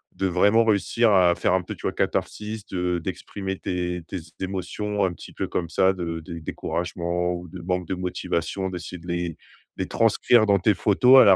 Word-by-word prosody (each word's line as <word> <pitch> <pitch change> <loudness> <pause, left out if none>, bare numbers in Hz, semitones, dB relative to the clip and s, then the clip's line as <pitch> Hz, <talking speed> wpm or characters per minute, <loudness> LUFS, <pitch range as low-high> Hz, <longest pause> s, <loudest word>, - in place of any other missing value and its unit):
de 95 - 0
vraiment 100 +5 +4
réussir 110 +2 +3
à 90 -3 +5
faire 90 - +1
un 95 0 +2
peu, - - -6
tu - - -16
vois, - - 0
catharsis 105 0 -2
te 90 -1 -1
d'exprimer 95 +3 -5
tes 90 -1 -3
tes 95 - -4 0.2
émotions 95 +2 -2
un 90 - -1
petit - - -11
peu - - -3
comme 85 -2 -2
ça, 95 +2 +3
de 85 -3 -4
dé 85 +1 -7
découragement 90 +2 -2
ou 90 0 -6
de 90 +2 -9
manque 90 0 -2
de 95 - -1
motivation, 90 +1 -2
d'essayer 90 0 -6
de 85 - -13
les 85 -2 -2 0.4
les - - -2
transcrire 120 -3 +4
dans 100 -2 +4
tes 105 +3 +3
photos 125 +7 +6
à - - +7
la 95 - +8
90 Hz, 200 wpm, -25 LUFS, 90-100 Hz, 0.4 s, la